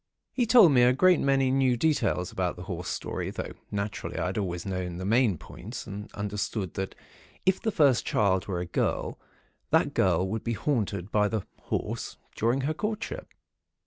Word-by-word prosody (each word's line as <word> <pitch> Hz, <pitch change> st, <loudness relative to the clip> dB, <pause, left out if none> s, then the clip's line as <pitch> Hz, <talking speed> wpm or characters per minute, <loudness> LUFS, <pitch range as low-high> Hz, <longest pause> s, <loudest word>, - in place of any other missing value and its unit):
He 245 Hz, -3 st, +1 dB
told 225 Hz, -8 st, +8 dB
me 125 Hz, -3 st, +5 dB
a 125 Hz, +1 st, +6 dB
great 180 Hz, +6 st, +5 dB
many 135 Hz, -1 st, +2 dB
new 130 Hz, -2 st, +3 dB
details 120 Hz, -, +1 dB
about 90 Hz, -2 st, -1 dB
the 90 Hz, -, -8 dB
horse 90 Hz, -1 st, -5 dB
story; -, -, -3 dB
though, -, -, -5 dB, 0.2 s
naturally, 100 Hz, 0 st, -4 dB
I 80 Hz, -, 0 dB
had 95 Hz, +2 st, -2 dB
always 90 Hz, -3 st, -3 dB
known 90 Hz, -2 st, -3 dB
the 95 Hz, -, -5 dB
main 110 Hz, -3 st, +3 dB
points, 110 Hz, -, -8 dB
and 105 Hz, 0 st, -7 dB
understood 105 Hz, -2 st, -3 dB
that 95 Hz, 0 st, -4 dB, 0.5 s
if 190 Hz, 0 st, +3 dB
the 220 Hz, -, 0 dB
first 145 Hz, -, +4 dB
child 95 Hz, -3 st, +1 dB
were 90 Hz, -3 st, -2 dB
a -, -, -3 dB
girl, 85 Hz, -, -1 dB, 0.5 s
that -, -, +3 dB
girl 95 Hz, -, +2 dB
would 110 Hz, +3 st, -3 dB
be 115 Hz, -, -1 dB
haunted 105 Hz, -, -1 dB
by 105 Hz, -1 st, +3 dB
the 105 Hz, -2 st, -2 dB, 0.2 s
Horse, -, -, -3 dB, 0.2 s
during 120 Hz, +5 st, +1 dB
her 145 Hz, +4 st, 0 dB
courtship. 210 Hz, +6 st, -4 dB
105 Hz, 180 wpm, -28 LUFS, 95-135 Hz, 0.5 s, told